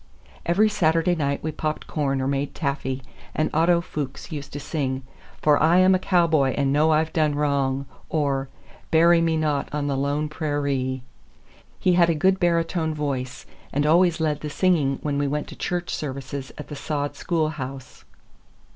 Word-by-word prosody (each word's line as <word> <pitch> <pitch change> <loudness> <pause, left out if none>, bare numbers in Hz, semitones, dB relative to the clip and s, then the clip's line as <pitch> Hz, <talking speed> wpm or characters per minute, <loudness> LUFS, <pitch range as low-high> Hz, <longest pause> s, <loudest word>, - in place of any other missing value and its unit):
Every 195 +6 +4
Saturday 165 -3 +2
night 140 -4 -1
we 155 - -1
popped 155 0 -3
corn 135 -3 -1
or - - -1
made 140 +1 -2
taffy, 135 -3 -2 0.3
and 155 - 0
Otto 170 +2 +3
Fuchs 145 -2 -6
used 145 -2 -6
to 145 - -4
sing, 135 -3 -2 0.4
"For 150 -1 +4
I 165 +3 +5
Am 185 +1 +6
a 185 - +3
Cowboy 160 -8 +2
and 140 -1 +2
Know 150 +2 +4
I've 155 +1 +2
Done 155 -3 +2
Wrong," 140 -2 0 0.2
or, 140 -3 0 0.4
"Bury 170 +1 +5
Me 165 -1 +1
Not 150 -3 0
on 150 -1 -2
the 140 -1 0
Lone 145 +3 0
Prairee." 140 -4 -2 0.8
He 180 - +3
had 175 -1 +5
a 165 - +2
good 190 +4 +2
baritone 165 -2 +1
voice 135 -4 -3 0.3
and 145 +1 0
always 170 +2 +4
led 155 -2 0
the 150 - -5
singing 150 -5 +2
when 145 -2 -1
we 145 - +1
went 150 +2 -2
to - - -9
church 175 -1 -3
services 135 -1 -5
at 150 - -8
the 150 - -6
sod 145 0 -3
schoolhouse. 150 -6 -3
150 Hz, 175 wpm, -24 LUFS, 140-165 Hz, 0.8 s, Am